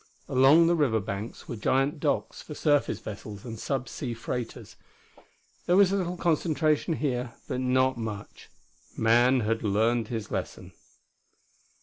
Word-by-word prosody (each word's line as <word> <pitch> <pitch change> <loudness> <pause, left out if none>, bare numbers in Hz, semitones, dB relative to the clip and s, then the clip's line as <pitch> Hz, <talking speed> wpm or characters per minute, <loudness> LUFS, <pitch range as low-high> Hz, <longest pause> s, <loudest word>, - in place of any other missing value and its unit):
Along 140 +6 +6
the 170 - +3
river 140 -9 +2
banks 100 +2 -6
were 120 - -5
giant 135 +7 +1
docks - - -1
for 150 - -9
surface 145 -2 +1
vessels 105 -1 -8
and 115 -2 -7
sub 130 0 -2
sea 120 -5 -5
freighters. 120 +1 -6 0.9
There 175 - +4
was 195 -2 +6
a - - +1
little 180 -2 -2
concentration 160 -1 +1
here, 125 -5 -2
but 125 - -2
not 130 0 +2
much. 105 -2 -7 0.5
Man 120 +3 +4
had 115 +1 -1
learned 110 +2 +1
his 110 -3 -5
lesson. - - -5
125 Hz, 140 wpm, -27 LUFS, 115-150 Hz, 0.9 s, Along